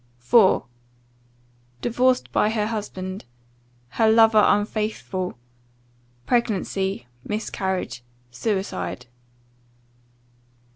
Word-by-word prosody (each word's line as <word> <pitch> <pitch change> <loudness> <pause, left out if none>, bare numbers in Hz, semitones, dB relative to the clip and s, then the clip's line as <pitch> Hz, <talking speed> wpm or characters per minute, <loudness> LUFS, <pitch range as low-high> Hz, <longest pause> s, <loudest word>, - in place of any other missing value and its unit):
IV. 190 - +4 1.2
"Divorced 250 +2 +1
by 210 - +2
her 215 -1 0
husband 195 - -5 0.6
Her 220 - +2
lover 220 -1 +6
unfaithful 205 - -1 0.9
Pregnancy 195 - 0 0.2
Miscarriage 190 - -3 0.3
Suicide." 190 - -3
210 Hz, 60 wpm, -23 LUFS, 190-225 Hz, 1.2 s, lover